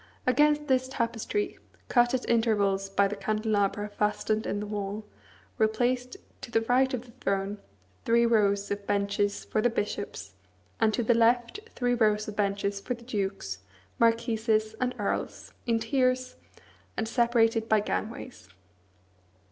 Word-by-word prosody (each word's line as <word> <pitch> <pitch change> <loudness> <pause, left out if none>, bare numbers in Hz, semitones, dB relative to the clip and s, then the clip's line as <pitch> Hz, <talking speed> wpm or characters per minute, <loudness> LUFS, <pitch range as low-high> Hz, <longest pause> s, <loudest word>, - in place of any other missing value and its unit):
Against 295 +3 +3
this 260 -2 +2
tapestry, 245 - -2 0.3
cut 240 0 +3
at 255 - -3
intervals 205 -4 +2
by 200 +1 +3
the 205 - -4
candelabra 210 -1 0
fastened 210 +1 -1
in 205 - -1
the 210 - -4
wall, 205 0 -4 0.5
were 220 - +5
placed, 245 +3 -1 0.2
to - - -7
the 225 -1 +2
right 255 +3 +2
of 240 - -6
the 240 - -15
throne, 195 +1 -1 0.4
three 235 +1 +4
rows 200 -3 +2
of 200 0 -4
benches 205 0 0
for 215 - 0
the 240 - +3
bishops, 205 - -4 0.5
and 220 - +4
to 240 - 0
the 240 - +4
left 235 - +2 0.2
three 245 -1 +1
rows 215 -3 +2
of 210 - -6
benches 200 -1 -1
for 250 - -3
the 235 - -15
dukes, 195 - -3 0.4
marquises, 225 -1 +2
and 250 0 0
earls, - - -3
in 230 -1 +3
tiers, 255 +2 0 0.6
and 220 - -1
separated 230 -1 +2
by 220 - +5
gangways. 225 - -4
220 Hz, 150 wpm, -28 LUFS, 205-240 Hz, 0.6 s, were